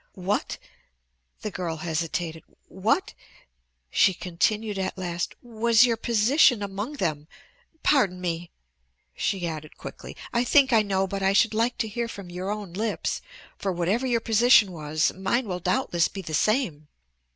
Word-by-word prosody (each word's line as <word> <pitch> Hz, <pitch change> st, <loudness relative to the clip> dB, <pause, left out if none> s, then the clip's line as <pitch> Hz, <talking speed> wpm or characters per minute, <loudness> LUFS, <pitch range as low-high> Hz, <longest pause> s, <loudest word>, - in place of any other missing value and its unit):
"What" 190 Hz, +3 st, -2 dB, 0.9 s
the 215 Hz, -, -3 dB
girl 175 Hz, -3 st, -3 dB
hesitated 160 Hz, 0 st, -3 dB, 0.2 s
"what," -, -, 0 dB, 0.8 s
she 190 Hz, -, +4 dB
continued 205 Hz, +4 st, -1 dB
at 190 Hz, -, -3 dB
last, 175 Hz, -2 st, -3 dB
"was 235 Hz, 0 st, +4 dB
your 235 Hz, -2 st, +1 dB
position 235 Hz, +1 st, +3 dB
among 200 Hz, +7 st, -4 dB
them? 155 Hz, -, -2 dB, 0.6 s
Pardon 205 Hz, -11 st, +3 dB
me," 170 Hz, -1 st, -3 dB, 0.6 s
she 190 Hz, -4 st, -1 dB
added 155 Hz, -2 st, -7 dB
quickly, -, -, -9 dB, 0.2 s
"I 235 Hz, 0 st, +2 dB
think 265 Hz, 0 st, +4 dB
I 225 Hz, -, +6 dB
know 195 Hz, -2 st, 0 dB
but 195 Hz, +1 st, -4 dB
I 195 Hz, 0 st, +3 dB
should 220 Hz, +2 st, +4 dB
like 230 Hz, +3 st, +1 dB
to 220 Hz, -, -1 dB
hear 235 Hz, +2 st, -3 dB
from 200 Hz, -5 st, -9 dB
your 180 Hz, +2 st, -4 dB
own 205 Hz, -4 st, -5 dB
lips, 215 Hz, +3 st, -2 dB, 0.4 s
for 195 Hz, -, -1 dB
whatever 185 Hz, +9 st, 0 dB
your 235 Hz, -2 st, +1 dB
position 225 Hz, -2 st, +5 dB
was, 155 Hz, -2 st, 0 dB
mine 205 Hz, +6 st, -1 dB
will 180 Hz, -2 st, -3 dB
doubtless 175 Hz, -5 st, +1 dB
be 195 Hz, -, -8 dB
the 160 Hz, -, -7 dB
same." 175 Hz, -, +1 dB
195 Hz, 150 wpm, -26 LUFS, 175-230 Hz, 0.9 s, I